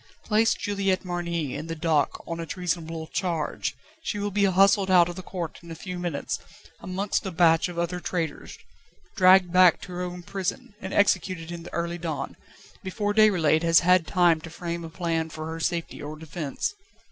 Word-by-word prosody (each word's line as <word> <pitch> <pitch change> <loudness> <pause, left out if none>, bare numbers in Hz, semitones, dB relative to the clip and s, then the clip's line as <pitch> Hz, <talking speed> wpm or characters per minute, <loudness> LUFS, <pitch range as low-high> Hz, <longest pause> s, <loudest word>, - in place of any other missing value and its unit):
Place 220 +1 +3
Juliette 195 -2 -1
Marny 170 -5 -2
in 150 +3 -5
the 165 - -4
dock 155 -2 0
on 165 0 -5
a 165 - -3
treasonable 165 -3 -3
charge, 165 -2 -2 0.3
she 235 - -3
will 205 0 -2
be 200 +1 +2
hustled 195 +1 +4
out 180 -2 +6
of 175 - -6
the 185 - -6
court 175 -3 -6
in 170 - -13
a 165 - -6
few 180 +2 -6
minutes, 175 -5 -3 0.4
amongst 195 +2 -2
a 190 - -3
batch 165 -1 +3
of 175 - -8
other 170 +1 -1
traitors, 165 -4 -4 0.6
dragged 185 -1 +6
back 180 -2 +6
to 180 - -9
her 180 0 -4
own 180 0 -5
prison, 195 +1 -4
and 190 - -5
executed 185 -4 +1
in 170 -1 -6
the - - -10
early 170 +1 -2
dawn, 160 -3 -4 0.5
before 205 +2 -2
Déroulède 180 -8 +4
has 165 -1 +5
had 180 -1 +4
time 175 -4 +3
to 165 - -9
frame 170 +1 -5
a 165 - -7
plan 165 -1 -2
for 155 0 -7
her 160 +1 -5
safety 170 0 -2
or 150 +1 -6
defence. 155 - -4
175 Hz, 190 wpm, -26 LUFS, 165-185 Hz, 0.6 s, out